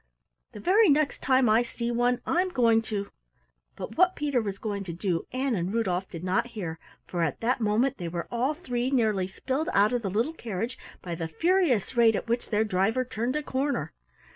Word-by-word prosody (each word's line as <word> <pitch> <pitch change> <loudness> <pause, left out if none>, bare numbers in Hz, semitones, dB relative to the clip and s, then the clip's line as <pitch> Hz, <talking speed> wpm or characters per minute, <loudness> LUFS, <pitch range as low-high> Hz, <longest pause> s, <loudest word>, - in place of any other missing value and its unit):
The 210 - -8
very 395 - +4
next 295 0 +2
time 260 -1 +3
I 220 +2 +5
see 235 0 -3
one, 245 +1 +1
I'm 365 +2 +1
going 230 -7 +3
to 200 -2 -3 0.3
" - - -46
But - - -7
what 365 0 +5
Peter 285 -4 0
was 200 -3 -4
going 200 -1 -3
to 175 - -5
do 175 -1 -2
Ann 260 0 -1
and 180 -2 -1
Rudolf 190 -5 -1
did 165 0 -8
not 185 +5 +1
hear, 165 -5 -4 0.3
for 175 - -3
at 160 -5 -1
that 245 +2 +1
moment 230 +5 +1
they 175 - -4
were 170 0 -4
all 255 +5 0
three 250 -6 -2
nearly 215 -8 +1
spilled 265 +10 -3
out 205 +4 +4
of 245 - 0
the 200 - -2
little 230 - 0
carriage 230 - -4 0.2
by 175 - -4
the 165 -1 -3
furious 325 - +1
rate 230 -2 +5
at - - -3
which 235 +1 -1
their 215 0 +2
driver 220 +5 +1
turned 240 +2 -2
a 300 - -1
corner. 265 - -2
230 Hz, 210 wpm, -27 LUFS, 195-260 Hz, 0.3 s, I